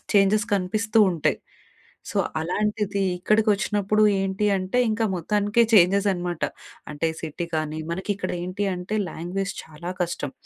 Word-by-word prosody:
Changes 205 +3 +4
కనిపిస్తూ 215 +4 0
ఉంటాయి. 165 -4 0 0.7
So, - - -6 0.2
అలాంటిది, 205 +3 -1
ఇక్కడికి 215 +4 +2
వచ్చినప్పుడు 210 0 +1 0.2
ఏంటి 195 +2 0
అంటే, 185 +6 -1
ఇంకా 225 +1 0
మొత్తానికే 205 +6 +2
చేంజెస్ 200 +1 +5
అనమాట. 175 -2 -4 0.5
అంటే 155 +2 -1
సిటీ 165 +2 -4
కానీ 155 0 -2
మనకి 190 +4 -4
ఇక్కడ 185 -2 -3
ఏంటి 185 +3 -2
అంటే, 180 +4 -4
లాంగ్వేజ్ 185 +5 -3
చాలా 160 +3 -8
కష్టం. 155 -5 -3
195 Hz, 130 wpm, -24 LUFS, 175-210 Hz, 0.7 s, చేంజెస్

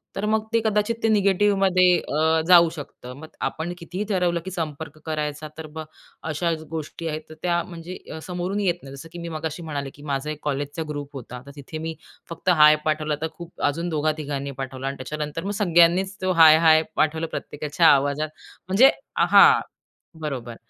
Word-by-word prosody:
तर 200 - -2
मग 215 0 +1
ते 230 - +4
कदाचित 210 +1 +1
ते - - +4
निगेटिव्हमध्ये 195 -3 +3
अ, 160 +2 +1
जाऊ 170 -2 +7
शकतं. 125 -4 -9
मग 160 - -10 0.2
आपण 170 +3 -4
कितीही 180 +4 -5
ठरवलं, 180 -3 +1
की 190 - -5
संपर्क 155 -3 -5
करायचा 150 -1 -3
तर 160 -1 -7
मग 160 -1 -5 0.4
अशा 170 +3 0 0.2
गोष्टी 160 +1 -5
आहेत, 155 0 -3
तर - - -9
त्या 175 -1 +1
म्हणजे 175 0 -9
अ, 160 - -6
समोरून 180 +3 -3
येत 185 -4 +1
नाही. 135 0 -9
जसं 160 +4 -11
की 175 - -8
मी 170 0 -6
मगाशी 160 +1 -5
म्हणाले 145 -3 -4
की 145 - -15
माझा 140 0 -3
एक 150 - -7
कॉलेजचा 145 +2 -3
ग्रुप 145 -1 -5
होता. 125 -1 -8
तर 140 - -11
तिथे 145 +2 -8
मी 160 0 -5 0.3
फक्त 170 +2 -3
हाय 150 -3 +7
पाठवला, 155 -1 0
तर 160 - 0
खूप 170 0 -11
अजून 170 +4 0
दोघा 155 -1 +1
तिघांनी 140 -2 -4
पाठवला 130 0 -5
आणि 140 - -4
त्याच्यानंतर 150 +4 -5
मग 200 - -3
सगळ्यांनीच 175 +2 +4
तो 185 0 +1
हाय, 160 -2 +8
हाय 160 -1 +5
पाठवलं 160 +1 +1
प्रत्येकाच्या 150 +1 0
आवाजात 145 +2 +3 0.4
म्हणजे 210 +9 +6 0.3
हां, - - +7 0.6
बरोबर 125 -6 -5
160 Hz, 185 wpm, -23 LUFS, 150-175 Hz, 0.6 s, हाय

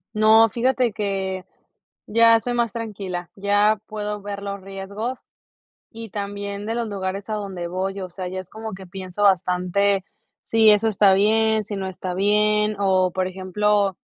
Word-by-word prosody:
No, 220 +1 +6
fíjate 250 +1 +1
que 195 -2 -3 0.6
ya 230 +1 +5
soy 245 - -2
más 235 -3 0
tranquila, 195 -6 -5
ya 205 +2 +2
puedo 210 -1 -4
ver 200 0 -6
los 200 0 -4
riesgos 200 +6 -6 0.7
y 225 -1 -8
también 200 0 -5
de 225 +1 -2
los 235 -1 -2
lugares 195 +1 -4
a 215 - -1
donde 190 -4 -5
voy, 190 +2 -3
o 185 - -5
sea, 185 +1 -6
ya 185 +1 -5
es 185 - -9
como 220 0 -7
que 190 -1 -10
pienso 190 +2 -5
bastante 190 +1 +2 0.4
si 220 -1 +5
eso 210 +2 +3
está 205 -2 +4
bien, 220 +2 +2
si 205 - -5
no 190 -1 -3
está 185 -1 -5
bien, 210 +2 +2
o 185 -2 +2
por 185 0 -1
ejemplo, 195 +1 0
200 Hz, 165 wpm, -22 LUFS, 190-215 Hz, 0.7 s, No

